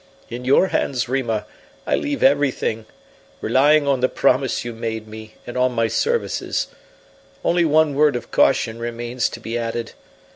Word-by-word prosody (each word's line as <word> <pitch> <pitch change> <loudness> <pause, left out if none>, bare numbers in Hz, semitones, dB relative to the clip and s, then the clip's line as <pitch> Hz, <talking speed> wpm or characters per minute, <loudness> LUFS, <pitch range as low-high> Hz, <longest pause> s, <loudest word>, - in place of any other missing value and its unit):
In 125 +1 -6
your 140 +8 +4
hands, 125 -3 -1
Rima, 120 -5 -1 0.4
I - - +1
leave 290 -1 -2
everything, 135 -5 +1 0.5
relying 145 +2 +3
on 135 -2 +2
the 130 - +2
promise 130 -2 +1
you 120 - -4
made 110 -1 -5
me, 110 0 -11
and 120 - -8
on 125 0 +1
my 115 -1 +1
services. 470 - -1 0.8
Only 175 0 +3
one 155 -1 +3
word 145 0 +3
of 120 - -6
caution 115 +1 +2
remains 120 +1 -2
to - - -8
be 115 +1 -4
added. 115 0 -3
125 Hz, 155 wpm, -21 LUFS, 115-140 Hz, 0.8 s, your